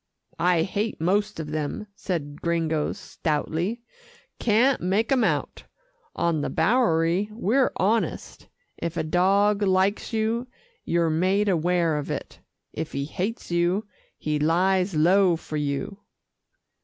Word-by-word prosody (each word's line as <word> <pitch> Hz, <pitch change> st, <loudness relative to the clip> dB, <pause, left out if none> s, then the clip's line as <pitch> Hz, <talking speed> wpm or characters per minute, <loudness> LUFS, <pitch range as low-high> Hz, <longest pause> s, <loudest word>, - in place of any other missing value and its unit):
"I 175 Hz, -2 st, +3 dB
hate 205 Hz, +4 st, -2 dB
most 200 Hz, +4 st, 0 dB
of 150 Hz, -2 st, -5 dB
them," 155 Hz, +7 st, -3 dB
said 150 Hz, -8 st, -4 dB
Gringo 165 Hz, -2 st, 0 dB
stoutly, 175 Hz, +4 st, -3 dB, 0.6 s
"can't 240 Hz, +5 st, +3 dB
make 200 Hz, +6 st, 0 dB
'em 260 Hz, -3 st, +3 dB
out. -, -, -1 dB, 0.5 s
On 165 Hz, -3 st, 0 dB
the -, -, -2 dB
Bowery, 175 Hz, -1 st, +2 dB
we're 235 Hz, +4 st, +1 dB
honest 220 Hz, +4 st, -1 dB, 0.3 s
if 170 Hz, 0 st, -4 dB
a 160 Hz, -, 0 dB
dog 195 Hz, +5 st, +2 dB
likes 190 Hz, +1 st, +1 dB
you, 225 Hz, +2 st, -1 dB, 0.4 s
you're 170 Hz, -1 st, +1 dB
made 190 Hz, +6 st, +2 dB
aware 170 Hz, -2 st, +1 dB
of 145 Hz, -, -4 dB
it. -, -, -5 dB, 0.3 s
If 160 Hz, 0 st, -5 dB
he 140 Hz, 0 st, -2 dB
hates 190 Hz, -, -4 dB
you, 175 Hz, +5 st, +1 dB, 0.3 s
he 150 Hz, -1 st, -2 dB
lies 180 Hz, +4 st, +2 dB
low 180 Hz, +3 st, +4 dB
for 155 Hz, -1 st, -6 dB
you." 145 Hz, +7 st, -3 dB
180 Hz, 130 wpm, -25 LUFS, 160-205 Hz, 0.6 s, low